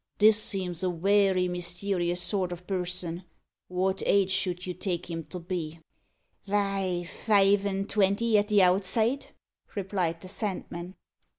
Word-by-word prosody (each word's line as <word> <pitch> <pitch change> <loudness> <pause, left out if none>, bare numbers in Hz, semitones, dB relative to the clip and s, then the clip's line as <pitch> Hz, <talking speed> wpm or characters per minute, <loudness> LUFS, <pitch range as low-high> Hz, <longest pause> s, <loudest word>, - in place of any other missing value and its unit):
"This 215 0 +5
seems 185 -4 -3
a 185 - +1
werry 190 +1 +2
mysterious 175 0 -1
sort 185 -1 +1
o' - - -2
person. 180 -1 -3 0.5
Wot 190 +1 0
age 195 -1 +3
should 180 -1 0
you 180 - -3
take 180 -2 -3
him 165 -1 -4
to 185 - -7
be?" 170 -2 -5 0.7
"Vy, 195 -3 0
five 200 +1 +2
an' 195 0 -1
twenty 210 +3 +2
at 205 - 0
the 205 -2 +4
outside," 220 +8 +2 0.5
replied 185 -4 -2
the - - -9
Sandman. 185 -3 -4
185 Hz, 135 wpm, -28 LUFS, 175-200 Hz, 0.7 s, This